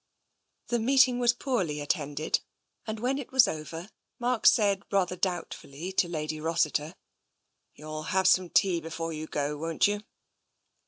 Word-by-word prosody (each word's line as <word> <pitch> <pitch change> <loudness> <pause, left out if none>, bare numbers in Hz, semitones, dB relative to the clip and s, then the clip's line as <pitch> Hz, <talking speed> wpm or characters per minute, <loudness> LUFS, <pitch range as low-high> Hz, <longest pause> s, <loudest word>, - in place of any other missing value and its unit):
The 240 - +1
meeting 255 +1 +4
was 240 -1 +4
poorly 235 - -2
attended, 145 0 -1 0.5
and 220 0 -4
when 260 +4 0
it 275 - -8
was 260 -2 +6
over 160 +4 -6 0.3
Mark 245 -1 +1
said 200 -3 +4
rather 185 -2 +1
doubtfully 175 -2 -4
to 190 -2 +2
Lady 155 -2 -4
Rossiter: 155 0 0 0.8
You'll 155 +1 -7
have 190 0 +2
some 185 -1 +4
tea 180 -2 +2
before 165 +1 -5
you 155 0 -6
go, 145 0 -2
won't 165 +1 +1
you? 205 0 0
175 Hz, 145 wpm, -28 LUFS, 155-220 Hz, 0.8 s, was